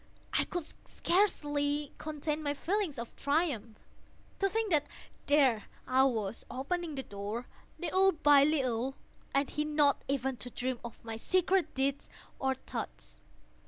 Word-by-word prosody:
I -, -, +3 dB
could 350 Hz, -3 st, -3 dB, 0.2 s
scarcely 295 Hz, -6 st, +1 dB
contain 305 Hz, 0 st, -2 dB
my 290 Hz, -1 st, -1 dB
feelings 365 Hz, -2 st, -1 dB
of 235 Hz, 0 st, -6 dB
triumph. 280 Hz, -8 st, 0 dB, 0.6 s
To 390 Hz, -, +2 dB
think 445 Hz, 0 st, -1 dB
that 300 Hz, -2 st, +3 dB, 0.4 s
there 270 Hz, -7 st, +4 dB, 0.2 s
I 260 Hz, +1 st, +4 dB
was, 225 Hz, -5 st, -1 dB
opening 315 Hz, +4 st, -2 dB
the 265 Hz, -, -3 dB
door, 205 Hz, +4 st, -5 dB, 0.3 s
little 380 Hz, +2 st, +3 dB
by 290 Hz, -4 st, +6 dB
little, 265 Hz, -4 st, +1 dB, 0.4 s
and 275 Hz, 0 st, +2 dB
he 300 Hz, -, -1 dB
not 295 Hz, -2 st, +3 dB
even 265 Hz, -1 st, -1 dB
to 245 Hz, -, -6 dB
dream 250 Hz, 0 st, -2 dB
of 235 Hz, -1 st, -9 dB
my 225 Hz, -1 st, -4 dB
secret 370 Hz, +4 st, +2 dB
deeds 270 Hz, +1 st, 0 dB, 0.3 s
or 265 Hz, 0 st, +1 dB
thoughts. -, -, -6 dB
285 Hz, 140 wpm, -32 LUFS, 250-315 Hz, 0.6 s, by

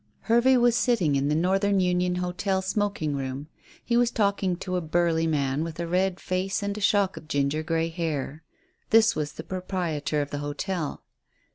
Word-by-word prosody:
Hervey 240 Hz, +3 st, +4 dB
was 240 Hz, -1 st, +4 dB
sitting 205 Hz, -, +2 dB
in 140 Hz, +1 st, +1 dB
the 150 Hz, -, +1 dB
Northern 195 Hz, +4 st, +2 dB
Union 180 Hz, 0 st, +1 dB
Hotel 180 Hz, +2 st, -1 dB
smoking 195 Hz, -6 st, -1 dB
room. 135 Hz, +2 st, -5 dB, 0.4 s
He 235 Hz, -, +1 dB
was 240 Hz, 0 st, +4 dB
talking 200 Hz, -4 st, 0 dB
to 185 Hz, +1 st, -4 dB
a 180 Hz, -, 0 dB
burly 165 Hz, 0 st, +1 dB
man, 145 Hz, -1 st, 0 dB
with 165 Hz, 0 st, -6 dB
a 170 Hz, -, -1 dB
red 185 Hz, +2 st, 0 dB
face 190 Hz, +2 st, -2 dB
and 200 Hz, 0 st, -2 dB
a 210 Hz, -, -6 dB
shock 200 Hz, -2 st, +2 dB
of 155 Hz, -, -10 dB
ginger 145 Hz, 0 st, 0 dB
grey 165 Hz, +1 st, -1 dB
hair. 160 Hz, -3 st, -3 dB, 0.5 s
This 225 Hz, +1 st, +5 dB
was 150 Hz, -1 st, -3 dB
the 160 Hz, -, -8 dB
proprietor 175 Hz, -5 st, -2 dB
of 145 Hz, -, -10 dB
the 145 Hz, -, -3 dB
hotel. 145 Hz, +3 st, -4 dB
180 Hz, 180 wpm, -26 LUFS, 155-195 Hz, 0.5 s, This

